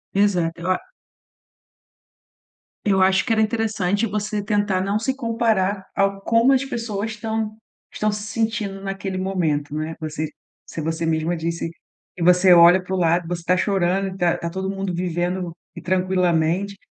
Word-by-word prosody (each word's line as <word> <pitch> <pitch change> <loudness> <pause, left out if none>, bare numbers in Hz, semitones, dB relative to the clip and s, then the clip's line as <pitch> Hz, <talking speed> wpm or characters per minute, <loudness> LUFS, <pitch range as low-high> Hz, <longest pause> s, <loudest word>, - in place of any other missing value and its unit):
Exato, 180 -5 +1
eu 175 - -3
a 185 - +1 2.1
Eu 195 -2 +3
acho 190 0 +4
que 245 - -2
era 220 - +3
interessante 215 -2 0
você 210 -1 -2
tentar 205 -3 +1
não 200 +2 0
se 260 +4 -1
comparar 225 -6 0
ao 195 0 +1
como 230 +5 +3
as 270 0 +2
pessoas 225 -4 -3
estão 220 0 -3 0.4
estão 215 0 0
se 205 0 -4
sentindo 210 -2 -2
naquele 195 -1 -4
momento, 165 -7 -1
não 155 +1 -2
é. 160 +1 -5
Você 155 0 -3 0.4
se 160 - -6
você 160 +1 -2
mesma 160 +1 0
disse 165 +1 -3 0.5
que - - -9
você 180 +2 +5
olha 175 +2 +7
para 185 +1 -5
o - - -1
lado, 170 0 +2
você 175 0 -3
está 180 +2 +2
chorando, 190 0 0
tá 175 -1 +2
tá 170 - -4
todo 190 +2 -3
mundo 195 -2 -3
vivendo 175 0 -2 0.2
e - - -8
tranquilamente. 185 +1 +1
190 Hz, 165 wpm, -22 LUFS, 175-210 Hz, 2.1 s, olha